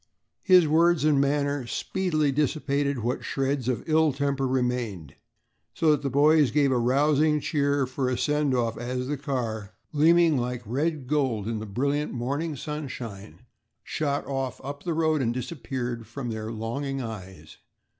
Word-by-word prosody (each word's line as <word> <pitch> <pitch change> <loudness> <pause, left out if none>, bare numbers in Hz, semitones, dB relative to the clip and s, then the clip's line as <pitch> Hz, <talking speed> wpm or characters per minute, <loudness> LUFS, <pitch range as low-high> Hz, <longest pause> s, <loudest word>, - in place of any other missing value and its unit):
His 180 -4 +6
words 165 0 +3
and 145 -3 +4
manner 140 -2 0
speedily 155 0 0
dissipated 140 -1 0
what 120 +2 -1
shreds 135 -2 -1
of 125 +4 -2
ill 160 -1 +4
temper 140 0 0
remained, 125 - -2 0.6
so 160 -2 +3
that 150 -2 +2
the 140 - -1
boys 145 +1 +4
gave 140 +2 +2
a 125 - +2
rousing 150 +5 +3
cheer 140 -2 +1
for 130 0 -2
a 125 - -1
send 150 -3 +1
off 115 -3 -1
as 125 +1 -3
the 145 +3 -2
car, 120 -7 -4 0.2
gleaming 160 +1 +4
like 125 0 -3
red 145 +5 -1
gold 130 -7 0
in 115 -1 -2
the 110 - -6
brilliant 140 +8 -1
morning 140 +6 -2
sunshine, 125 -9 -7 0.4
shot 145 -2 -2
off 135 -2 -3
up 140 +2 -6
the 170 -3 -2
road 155 -2 +2
and 120 -1 0
disappeared 125 -3 -4
from 130 -4 -5
their 110 0 -4
longing 135 +5 -3
eyes. 95 -9 -8
140 Hz, 155 wpm, -26 LUFS, 120-150 Hz, 0.6 s, His